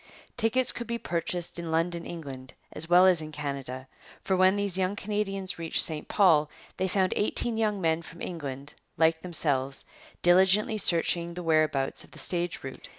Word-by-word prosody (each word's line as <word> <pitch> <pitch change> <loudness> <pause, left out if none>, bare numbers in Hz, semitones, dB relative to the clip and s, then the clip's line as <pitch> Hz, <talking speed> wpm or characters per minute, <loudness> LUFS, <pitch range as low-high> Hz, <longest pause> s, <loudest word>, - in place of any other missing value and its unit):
Tickets 240 +2 +2
could 235 - -6
be 235 0 -2
purchased 175 -3 -3
in 170 -1 -5
London, 170 +1 -1
England, 135 -6 -8 0.2
as 165 - -4
well 180 +1 +7
as 180 -3 +5
in 155 0 -7
Canada, 135 -3 -5 0.4
for 190 - +1
when 185 +1 +4
these 200 -3 0
young 190 +1 0
Canadians 195 -3 -3
reached 165 -1 +2
St 155 -2 -3
Paul, 160 -7 +4 0.3
they 190 - 0
found 185 0 +1
eighteen 225 +2 +1
young 215 -2 0
men 165 -2 +1
from 170 0 -12
England, 145 -5 -6 0.2
like 160 0 +3
themselves, 140 -6 -1 0.4
diligently 190 +4 +4
searching 170 -1 +1
the 180 - -5
whereabouts 155 -4 +1
of - - -17
the - - -14
stage 175 -1 -2
route. 135 0 -8
170 Hz, 170 wpm, -28 LUFS, 155-190 Hz, 0.4 s, well